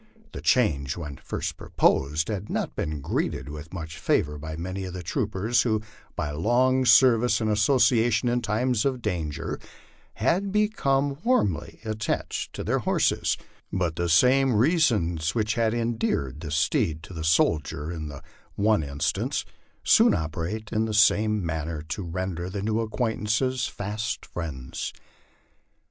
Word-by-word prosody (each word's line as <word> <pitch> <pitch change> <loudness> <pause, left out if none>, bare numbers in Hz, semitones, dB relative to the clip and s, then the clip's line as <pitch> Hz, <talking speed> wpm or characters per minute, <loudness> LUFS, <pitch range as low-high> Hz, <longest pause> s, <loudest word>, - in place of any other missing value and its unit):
The - - -7
change 75 - +2
when 75 -5 -6
first - - -4
proposed 75 +4 +1
had 105 -1 -4
not - - -2
been 75 -2 -3
greeted 70 - -2
with 75 +2 -8
much 80 -3 -7
favor 75 0 +1
by 80 +1 -6
many 95 +3 -4
of 90 -1 -6
the 90 - -6
troopers 105 +7 0
who 110 -3 0 0.3
by 75 - -2
long 125 - +2
service 120 +1 +5
and 110 -1 0
association 115 +1 +3
in 120 0 +1
times 115 +1 0
of 130 -3 -1
danger 85 -8 -3 0.6
had 195 +3 +1
become 145 -10 +1
warmly 105 - 0
attached 110 -1 -2
to - - -5
their - - +1
horses; - - +1 0.3
but 90 -4 -1
the 85 +1 -1
same 125 +9 +4
reasons 105 - +2
which 110 -1 +1
had 115 -1 +1
endeared 115 - -1
the 80 - -6
steed 80 +1 0
to 90 - -10
the 80 -2 -5
soldier 80 -1 +1
in 80 -3 -5
the 70 -1 -9 0.3
one 105 -2 +3
instance, 70 -1 -2 0.4
soon - - +5
operate 85 +7 -4
in 110 0 +1
the 110 -1 -2
same 105 -2 +4
manner 80 -1 -3
to 80 +6 -5
render 90 0 -4
the 100 +1 -4
new 110 +1 0
acquaintances 115 +2 0
fast 105 +1 -4
friends. 70 -7 -5
105 Hz, 145 wpm, -26 LUFS, 80-115 Hz, 0.6 s, service